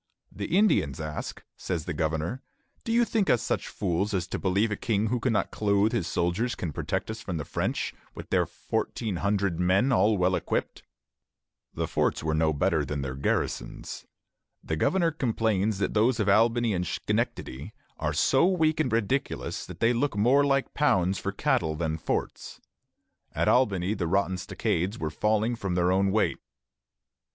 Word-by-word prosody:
"The 105 - -1
Indians 140 - +2
ask," 75 -1 -5
says 80 -4 -3
the - - -3
governor, 80 - -2 0.4
"'Do 230 - -3
you 235 +1 +4
think 220 -4 0
us 120 - +3
such - - -1
fools 100 +2 -1
as 90 -3 0
to - - -3
believe 100 +4 +1
that - - -1
a - - -36
king 110 -2 +1
who 125 +1 0
cannot 115 -3 0
clothe 100 0 +2
his 115 -9 -1
soldiers 90 +9 0
can 80 -4 -4
protect - - -2
us 110 0 -7
from 90 -3 -4
the 75 - -4
French, - - -2 0.2
with - - -9
their - - +2
fourteen 105 -6 -3
hundred 100 -3 0
men 95 +9 +3
all 110 -3 +3
well 90 0 +2
equipped?'" - - -2 0.9
The - - -1
forts - - 0
were 80 0 0
no 80 0 +2
better 80 0 +1
than 70 0 -3
their 65 -1 -4
garrisons. 65 -2 -3 0.6
The 80 - -2
governor 170 - +2
complains 110 -7 0
that 100 - -1
those 115 +3 +2
of 105 - +1
Albany 115 +2 +3
and 90 -1 -1
Schenectady 70 +4 -3 0.3
"are 75 - 0
so 135 - +3
weak 160 -4 +2
and 155 - +1
ridiculous 115 +4 -1
that - - -10
they 115 +2 +4
look 120 -2 0
more 125 +7 +4
like 135 -1 +1
pounds 95 -10 +2
for - - -3
cattle 80 -1 0
than 80 0 -2
forts." - - -3 0.8
At - - +1
Albany 100 -6 +2
the 90 -5 -2
rotten 95 +1 +1
stockades 90 +3 -1
were 80 -1 -3
falling 110 +6 +1
from 95 -5 -3
their 90 0 +2
own 95 +1 +3
weight. 105 +2 +1
100 Hz, 175 wpm, -27 LUFS, 85-115 Hz, 0.9 s, you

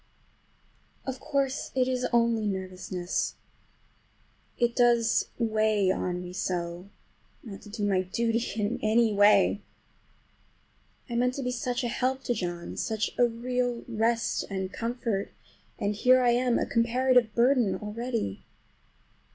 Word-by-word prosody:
Of 265 -1 -4
course 275 0 -1
it 255 -1 +2
is 255 -1 0
only 230 -2 +2
nervousness. 185 -2 -3 1.2
It 240 -1 +1
does 235 -2 +3
weigh 215 -4 +2
on 180 -1 -2
me 180 0 -8
so 175 0 -3 0.5
not 200 -4 -9
to 210 - -13
do 205 0 -2
my 190 -2 +2
duty 230 +5 0 0.2
in 210 +2 -1
any 220 0 +3
way! 205 +1 +4 1.5
I 240 - -6
meant 250 +2 +1
to 275 - -4
be 250 - -1
such 250 +1 -2
a - - 0
help 260 +2 -1
to 245 - 0
John, 175 -5 -5
such 220 -1 -1
a 245 - +6
real 245 +1 -2
rest 230 0 0
and 190 -1 -4
comfort, 230 -4 -3 0.4
and 205 +1 -1
here 255 +4 +4
I 240 - +4
am 245 0 +2
a - - 0
comparative 240 -1 +2
burden 240 -3 +3
already! 220 - -4
230 Hz, 135 wpm, -28 LUFS, 205-245 Hz, 1.5 s, a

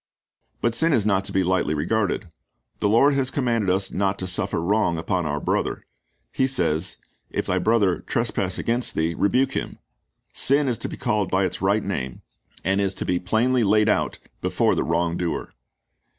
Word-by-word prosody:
^ - - -42
But 120 - +1
sin 160 +6 +3
is 110 -6 +2
not 95 -2 +2
to - - -1
be 95 - +2
lightly 90 -4 +1
regarded. 100 +8 0 0.5
The 100 - +1
Lord 135 +7 +5
has 135 -2 +1
commanded 120 -8 0
us 95 +1 +1
not 95 0 0
to 95 - -4
suffer 90 -2 -1
wrong 90 0 +1
upon 90 0 -1
our 75 0 -1
brother. - - -1 0.5
He 130 - +1
says, 90 -10 0 0.3
"If - - -2
thy 95 - 0
brother 100 -3 +2
trespass 95 -1 -2
against 120 +1 -1
thee, 80 +1 0
rebuke 125 +10 +2
him."'^ - - -4 0.6
Sin 140 +1 +2
is 120 -3 -1
to - - -4
be - - -7
called 105 -5 0
by 95 +1 +2
its 90 - -4
right 100 +2 +2
name, 65 -10 -4 0.4
and 95 +2 +2
is 100 -1 0
to - - -4
be 90 -1 0
plainly 115 +7 +1
laid 105 +1 +3
out - - +1 0.2
before - - +2
the - - 0
wrong 85 +1 0
doer. 85 -2 -3
100 Hz, 190 wpm, -23 LUFS, 90-115 Hz, 0.6 s, Lord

